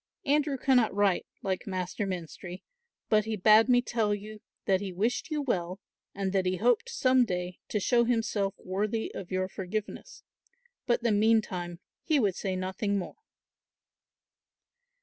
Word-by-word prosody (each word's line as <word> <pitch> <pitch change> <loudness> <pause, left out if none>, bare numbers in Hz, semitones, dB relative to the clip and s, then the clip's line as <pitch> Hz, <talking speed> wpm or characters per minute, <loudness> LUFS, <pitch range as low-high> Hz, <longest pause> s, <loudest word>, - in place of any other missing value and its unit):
"Andrew 290 -1 +2
cannot 250 -5 +3
write, 200 -2 +2 0.2
like 190 0 -2
Master 185 +2 -3
Menstrie, 180 0 -6 0.4
but 215 -1 +3
he 220 0 -2
bade 215 +4 +6
me 245 -1 +5
tell 220 -4 0
you 210 +1 -9 0.2
that 190 -1 +2
he 195 -2 -4
wished 215 - -1
you 300 -2 -1
well 185 -7 -2 0.4
and 195 -1 -2
that 190 -2 +1
he 185 - +1
hoped 235 +3 +2
some 255 -1 +3
day 180 -4 -3
to 210 - -1
show 235 +4 +3
himself 225 -4 0
worthy 210 +4 -2
of 185 - -7
your 185 0 -1
forgiveness, 205 - -6 0.6
but 240 -1 +1
that 235 - +2
meantime 205 -5 +1 0.2
he 310 -4 +2
would 205 -6 +2
say 190 -2 -2
nothing 190 +2 -1
more." 185 - -5
205 Hz, 150 wpm, -29 LUFS, 185-230 Hz, 0.6 s, bade